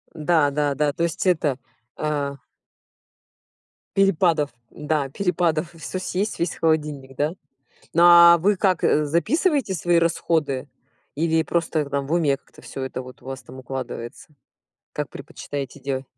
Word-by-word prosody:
Да, 155 -2 +2
да, 145 0 0
да. 145 0 +1
То 170 - -2
есть, 170 +1 -1
это, 155 -7 +2 0.4
а 145 -2 -2 1.6
перепадов. 170 -6 +3 0.2
Да, 150 -2 -2
перепадов. 170 -1 0
И - - -14
всё 185 +3 -5
съесть, 195 +3 -2
весь 170 -1 -1
холодильник, 150 -4 -1
да? 150 +3 0 0.6
Но, 170 - +4 0.3
а 170 - +5
вы 200 +5 +2
как, 185 -3 +1
записываете 195 - +1
свои 175 0 +2
расходы? 160 -5 0 0.5
Или 160 +1 +1
просто 160 -1 0
там 140 0 -1
в 150 - -5
уме 150 -5 +2
как-то - - -20
всё 135 - -7
это 130 -1 -4
у 130 0 -11
вас 135 0 -7
там 130 - -12
укладывается? 130 -2 -6 0.6
Как - - -3
предпочитаете 140 -1 -7
делать? 135 0 -3
155 Hz, 140 wpm, -23 LUFS, 140-170 Hz, 1.6 s, а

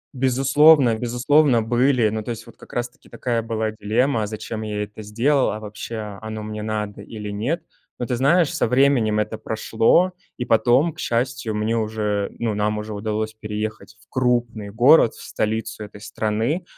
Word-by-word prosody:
Безусловно, 135 +1 +5
безусловно 125 +2 +2
были, 120 0 +2
но, 110 +1 -3
то 105 - -8
есть, 115 -3 -5
вот - - -15
как - - -16
раз-таки 120 0 -5
такая 120 -2 -2
была 110 -1 -2
дилемма: 110 +2 0
зачем 110 +1 -5
я 105 -1 -3
это 105 +1 -9
сделал, 120 +7 +1
а 110 - -4
вообще 105 -1 -7
оно 110 -1 -6
мне 105 0 -5
надо 105 -1 -4
или 105 0 -7
нет. 120 - -2 0.3
Но, 120 - -3
ты 125 - -1
знаешь, 145 +6 +3
со - - +1
временем 125 -5 +3
это 105 +1 -2
прошло, 115 +11 +2 0.3
и 125 - -3
потом, 125 +8 +3
к - - -16
счастью, 120 -1 -1
мне 110 +2 0
уже, 105 -2 -1
ну, 115 -2 -1
нам 105 +1 0
уже 105 0 -5
удалось 110 +1 -3
переехать 110 0 -6
в - - -23
крупный 120 -4 0
город, 120 +4 +5
в - - -12
столицу 110 0 -3
этой 105 0 -13
страны, 110 - -1
110 Hz, 170 wpm, -22 LUFS, 105-125 Hz, 0.3 s, Безусловно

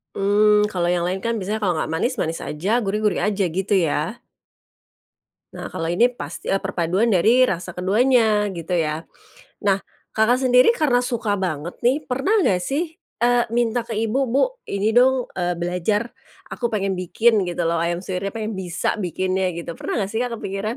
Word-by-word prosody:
Mmm, 210 +1 +4
kalau 175 -2 -1
yang 175 -1 +1
lain 185 +2 -1
kan, 230 +3 -2
biasanya 210 +1 -3
kalau 185 -5 0
nggak 155 0 -2
manis, 240 +11 0
manis 165 -7 -2
aja, 195 +11 -1
gurih, 210 -2 -1
gurih 210 -3 +1
aja, 205 -2 0
gitu 195 +4 0
ya? 165 +4 0 1.4
Nah - - -7
kalau 165 - -3
ini, 230 +9 +3
pas 245 - -8
eee, 195 - 0
perpaduan 190 +3 0
dari 230 +6 +4
rasa 180 0 -3
keduanya, 215 +3 +2
gitu 175 0 -3
ya. 160 -1 -1 0.6
Nah, 195 -1 +3 0.3
Kakak 245 +4 +2
sendiri 250 0 +5
karena 260 - +2
suka 225 -5 -1
banget 170 -2 -3
nih, 265 +6 +1
pernah 270 - 0
nggak 180 -2 +2
sih, 310 - -3 0.3
eee, 240 0 +4
minta 240 0 +1
ke 230 - -5
Ibu, 225 +4 0
"Bu 260 +4 +2 0.3
ini 200 +2 0
dong, 255 +2 +3
eee, 175 -1 -1
belajar 180 +6 -1 0.4
aku 240 - -2
pengen 195 -3 -1
bikin, 210 +3 +2
gitu 175 0 -2
loh 165 0 +1
ayam 170 +1 -1
suwirnya 190 +1 -4
pengen 220 -1 -3
bisa 180 +3 -2
bikinnya." 185 +1 -1
Gitu, 170 0 -6
pernah 215 - -2
nggak 195 - -4
sih 220 - -1
Kak, 245 -1 -2
kepikiran? 210 +3 -4
205 Hz, 180 wpm, -22 LUFS, 180-235 Hz, 1.4 s, sendiri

